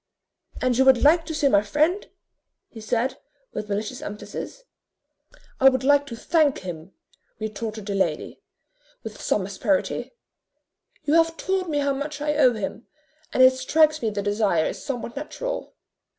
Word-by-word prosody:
"And 255 -1 +2
you 265 - +5
would 265 -2 +5
like 325 +2 +5
to 320 - -4
see 295 -2 +2
my 200 -7 +4
friend?" 305 - 0 0.6
he 225 - -11
said, 235 +4 -1 0.3
with 210 - -5
malicious 210 +5 -3
emphasis. 210 - -7 1.0
"I 270 - +8
would 260 -1 -2
like 285 +1 +4
to 235 - -6
thank 295 +4 +1
him," 175 -1 -8 0.4
retorted 215 0 -5
the 200 - -3
lady, 180 -6 -2 0.6
with 220 -1 -8
some 195 - 0
asperity: 200 - -1 0.9
"you 295 - 0
have 330 0 +3
told 380 -2 -1
me 295 - -1
how 280 -1 +1
much 290 +2 -5
I 295 0 0
owe 260 -5 +4
him, 220 +1 -5 0.4
and 255 - +4
it 255 0 +8
strikes 310 +4 +2
me 225 - 0
the 205 -1 -3
desire 205 -6 +1
is - - -4
somewhat 245 -3 -5
natural." - - -5
260 Hz, 160 wpm, -24 LUFS, 210-295 Hz, 1.0 s, I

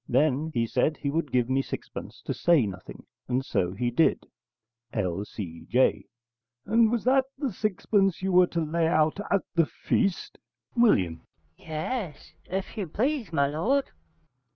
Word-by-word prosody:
Then 145 +4 +2
he 115 -1 +2
said 130 +6 +1
he 140 - -2
would 155 -3 -1
give 125 -2 +2
me 130 +1 +2
sixpence - - -8
to - - -2
say 170 -8 +3
nothing, 95 -3 -8 0.2
and 130 +1 0
so 90 -1 0
he 120 +4 -1
did.' 160 +7 +2 0.7
L.C.J. 100 +3 -1 0.6
And 225 0 +4
was 235 -3 0
that 260 +1 +4
the 270 -6 -2
sixpence 195 -2 0
you 190 - 0
were 180 0 +6
to 170 - -2
lay 165 +1 +1
out 155 +2 +2
at 200 - +2
the 165 -3 +3
feast? 195 +2 -1 0.4
W. 95 - +3 0.4
Yes, 160 - -5
if 190 +1 -4
you 200 -4 -2
please, 240 - -1
my 140 -4 +2
lord. 215 - 0
160 Hz, 150 wpm, -27 LUFS, 125-200 Hz, 0.7 s, were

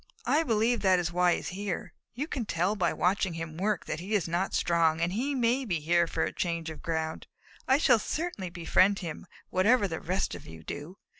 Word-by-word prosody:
I 305 - +3
believe 230 -4 +2
that 190 -2 +4
is 175 -1 -1
why 180 0 +4
he - - -1
is - - -6
here. 195 -1 -4 0.2
You 275 +5 -2
can 260 -8 -4
tell 180 +5 +1
by - - +1
watching 185 -1 +1
him 165 -1 -5
work 205 +4 -1
that 155 - -3
he 195 +5 -2
is 185 -6 +1
not 175 +3 -1
strong, 165 -2 +2
and 170 +2 0
he 270 +7 -1
may 250 +1 +2
be 180 -9 -1
here 170 +3 +2
for - - -1
a - - -2
change 170 -2 -2
of 155 - -10
ground. 160 -1 -3 0.4
I 265 - +5
shall 245 -6 +4
certainly 300 - -3
befriend 185 +3 +3
him, 165 +2 -6 0.2
whatever 205 +3 +4
the 160 -3 -4
rest 185 +4 -1
of - - -9
you 80 0 -11
do. 150 - -7
185 Hz, 220 wpm, -29 LUFS, 165-215 Hz, 0.4 s, I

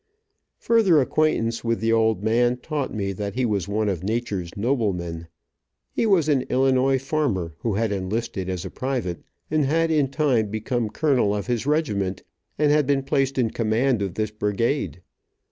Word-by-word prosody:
Further 210 -9 +4
acquaintance 125 -5 +1
with 115 -1 0
the 115 +1 +1
old 110 -3 +2
man 120 +3 +2
taught 145 +1 -3
me 100 -2 -2
that 100 +1 -5
he 130 0 +1
was 100 -6 -1
one 105 +1 0
of 95 -5 -1
nature's 105 -4 -2
noblemen. 95 -8 -1 0.6
He 230 - 0
was 180 -7 +3
an 145 -4 +3
Illinois 130 +1 +3
farmer, 130 - -1
who 110 -4 -1
had 110 0 0
enlisted 100 0 -3
as 90 -2 -3
a - - -6
private, 125 -10 -3 0.3
and 155 -1 +2
had 165 +3 +1
in 150 -3 +3
time 135 -7 +1
become 110 +2 -2
colonel 125 -5 +1
of 100 - -3
his 120 +1 -2
regiment, 105 - 0 0.3
and 150 0 +3
had 150 -2 +3
been 140 -1 +2
placed 135 -1 0
in 120 -4 +1
command 115 +1 +1
of 95 -4 -3
this 110 -1 -1
brigade. 105 +1 -1
115 Hz, 170 wpm, -24 LUFS, 105-135 Hz, 0.6 s, Further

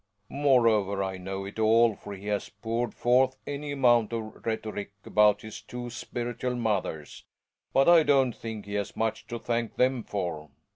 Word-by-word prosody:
.Morever, 115 -8 +3
I 95 -1 -3
know 95 +1 -5
it 100 +3 -8
all, 115 +1 +5
for 100 -1 -9
he 100 +1 -12
has 105 -1 -2
poured 115 +1 -3
forth 130 +2 +3
.any 145 0 -4
amount 120 -5 +3
of 110 -1 -6
rhetoric 110 -2 -3
about 105 -1 +4
his 110 -1 -8
"two 120 0 -7
spiritual 120 +1 -4
mothers." 100 - -3 0.5
But 135 - +3
I 170 -1 +8
don't 135 -5 +3
think 110 -2 -7
he 100 - -7
has 100 -1 -3
much 110 0 -2
to 120 - -4
thank 115 0 -2
them 125 -1 +2
for. 85 -7 -4
115 Hz, 165 wpm, -28 LUFS, 105-125 Hz, 0.5 s, I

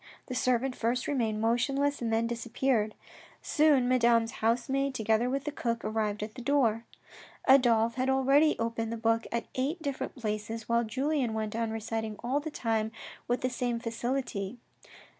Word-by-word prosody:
The 255 - -6
servant' 255 +1 +1
first 240 +2 -1
remained 225 -6 0
motionless, 275 +5 +1
and 230 -1 -1
then 225 +1 +2
disappeared. 235 -1 0 0.5
Soon 295 -5 +3
Madame's 235 -2 +3
house 230 +2 +2
maid, 275 0 0
together 225 +1 +1
with 275 +1 -1
the 295 - -3
cook, 235 -4 -2
arrived 210 -1 -1
at 215 0 -6
the 255 - -8
door. 235 -4 +2 0.6
Adolphe 235 -3 +4
had 260 +1 +1
already 275 +3 +4
opened 230 0 -2
the 230 - -3
book 225 0 +1
at 235 0 -1
eight 280 +7 -1
different 280 -4 -4
places, 215 -1 -4
while 235 0 +2
Julien 260 +1 -1
went 220 -1 -3
on 230 -1 -1
reciting 220 0 -3
all 260 +4 +1
the 305 +2 -5
time 225 -6 -1 0.4
with 245 +1 0
the 255 - 0
same 245 -1 -1
facility. 235 -2 -3
235 Hz, 165 wpm, -30 LUFS, 225-265 Hz, 0.6 s, Adolphe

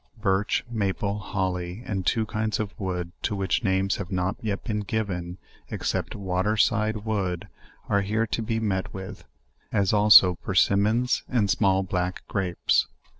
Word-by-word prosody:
Birch, 100 0 0
maple, 100 -2 -1
holly, 95 0 -3
and 95 -3 -2
two 110 -1 +2
kinds 110 0 -2
of 105 -2 -3
wood, 90 -3 -3
to 105 - -1
which 95 +2 0
names 95 -1 +1
have 100 -1 -6
not 90 +1 0
yet 105 -3 -3
been 105 -3 -2
given, 95 -4 -3 0.3
ex - - -3
cept - - -2
"water 95 +2 -1
side 110 0 +1
wood," 95 -3 -2 0.4
are 100 - +2
here 110 +3 0
to 115 - -2
be 115 0 -1
met 95 -5 -2
with; 95 0 -8 0.5
as 100 0 +2
also 105 -3 +8
persimmons 105 +7 +2
and 105 -6 +2
small 95 -2 +2
black 90 -1 -3
grapes. 95 -3 +1
100 Hz, 155 wpm, -26 LUFS, 95-110 Hz, 0.5 s, also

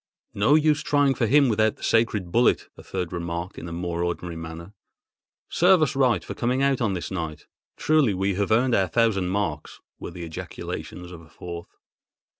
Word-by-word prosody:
"No 105 +9 +3
use 155 -1 +3
trying 145 -2 +2
for 120 -3 0
him 140 +3 +5
without 110 -1 +2
the - - -15
sacred 105 -6 +1
bullet," 120 +4 +2
a - - -12
third 90 -2 -5
remarked 85 +1 -4
in 85 - -8
a - - -8
more 85 0 -3
ordinary 85 0 -3
manner. 80 +3 -8 0.7
"Serve 180 -1 +4
us 145 -1 -1
right 125 -9 +2
for - - -5
coming 125 +3 0
out 140 -2 +2
on 110 -5 +1
this 90 - -5
night! 80 -5 -5 0.3
Truly 150 -10 +2
we 95 +1 0
have 100 +1 -1
earned 120 +3 +3
our 95 -3 +3
thousand 110 -6 +1
marks!" 95 -6 -3 0.2
were - - -6
the 85 - -8
ejaculations 90 +2 -7
of 85 -2 -10
a 80 - -18
fourth. 85 +1 -8
100 Hz, 190 wpm, -24 LUFS, 85-125 Hz, 0.7 s, him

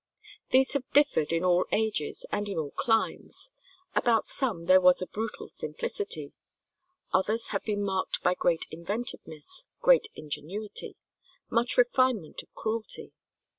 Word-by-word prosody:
These 265 +1 +4
have 275 -3 -2
differed 285 - +3
in 165 +1 +1
all 180 0 +3
ages 215 -9 -1
and 205 0 -1
in 195 - -3
all 150 -3 -2
climes: 225 - -1 0.4
about 230 -2 +3
some 215 -11 -1
there 185 +1 +7
was 180 0 +6
a 185 - -2
brutal 220 +3 -5
simplicity; 445 -2 -4 0.8
others 215 +5 +1
have 200 - -2
been 205 -2 -1
marked 190 -2 -1
by 180 - +4
great 170 -2 +1
inventiveness, 170 - -6
great - - +5
ingenuity, 175 +8 -6 0.6
much 235 +1 +1
refinement 245 -7 +2
of - - -25
cruelty. 220 0 -3
210 Hz, 130 wpm, -29 LUFS, 180-245 Hz, 0.8 s, there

